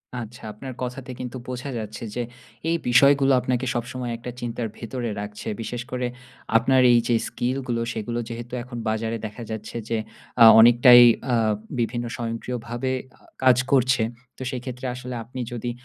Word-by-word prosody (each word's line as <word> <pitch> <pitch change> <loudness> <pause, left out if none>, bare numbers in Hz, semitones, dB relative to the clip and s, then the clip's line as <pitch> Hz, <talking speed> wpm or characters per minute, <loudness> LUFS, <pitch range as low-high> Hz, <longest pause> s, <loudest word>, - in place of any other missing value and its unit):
আচ্ছা। 120 -1 -7
আপনার 130 +4 -8
কথাতে 125 +1 -5
কিন্তু 125 +1 -5
বোঝা 125 +2 -5
যাচ্ছে 110 +1 -7
যে 125 - -1 0.5
এই 170 - +2
বিষয়গুলো 140 +2 +5
আপনাকে 125 0 -1
সবসময় 120 0 -3
একটা 125 +1 -7
চিন্তার 120 -1 -3
ভেতরে 120 +1 -4
রাখছে। 105 0 -8
বিশেষ 120 +2 -4
করে 125 -1 -1 0.5
আপনার 130 +3 +3
এই 120 - +6
যে 120 - +3
স্কিলগুলো, 125 -1 -2
সেগুলো 115 +2 -3
যেহেতু 120 +1 -7
এখন 125 -1 -8
বাজারে 110 +1 -1
দেখা 110 +2 -7
যাচ্ছে 110 +1 -6
যে 115 - +1 0.4
আ - - +12 0.2
অনেকটাই 120 +2 +8 0.3
আ - - +4 0.4
বিভিন্ন 120 +1 -1
স্বয়ংক্রিয়ভাবে 120 +2 -3 0.3
আ - - -28 0.2
কাজ 130 -2 +6
করছে, 130 -2 +3 0.4
তো - - -11
সেই 125 -2 -4
ক্ষেত্রে 125 0 -6
আসলে 125 0 -6
আপনি 125 +3 -9
যদি 120 0 -3
120 Hz, 160 wpm, -24 LUFS, 115-125 Hz, 0.5 s, আ